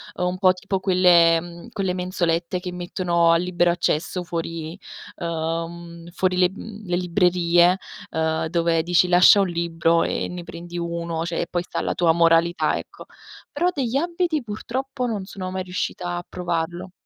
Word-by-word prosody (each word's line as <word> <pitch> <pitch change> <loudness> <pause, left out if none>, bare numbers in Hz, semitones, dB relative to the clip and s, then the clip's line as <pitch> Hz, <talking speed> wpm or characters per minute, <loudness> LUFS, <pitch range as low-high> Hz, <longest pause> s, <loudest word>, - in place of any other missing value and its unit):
Uhm, 180 - -1
un 180 +1 -2
po' 185 -2 +5
tipo 195 +1 -3
quelle 180 -3 +5
mhmm, 175 +4 -11
quelle 195 -5 -1
mensolette 180 -1 -1
che 180 0 -6
mettono 175 -1 0
a 165 - +5
libero 175 0 +1
accesso 175 +1 -1
fuori 165 +1 -5 0.4
uhm, 170 +1 -4
fuori 185 0 0
le 180 -1 +4
mhmm, 210 +1 -10
le 175 - 0
librerie, 175 0 +3 0.3
uhm, 160 0 0
dove 165 -1 +1
dici 175 +1 +3
"lascia 180 +3 +7
un 195 - +1
libro 170 0 +1
e - - -2
ne 180 -1 -6
prendi 175 +1 -8
uno", 170 -1 -3
cioè, 170 -1 -2
e 170 - -3
poi 175 - -1
sta - - -8
alla - - -1
tua 170 -2 +3
moralità 170 +1 +3
ecco. - - -10 0.5
Però 340 +5 0
degli 260 -2 -1
abiti 340 -1 0
purtroppo 250 +4 -4
non 205 -4 -3
sono 185 -2 -6
mai 190 0 -3
riuscita 180 -1 -3
a 175 - -6
provarlo. 175 0 -3
175 Hz, 170 wpm, -23 LUFS, 170-185 Hz, 0.5 s, lascia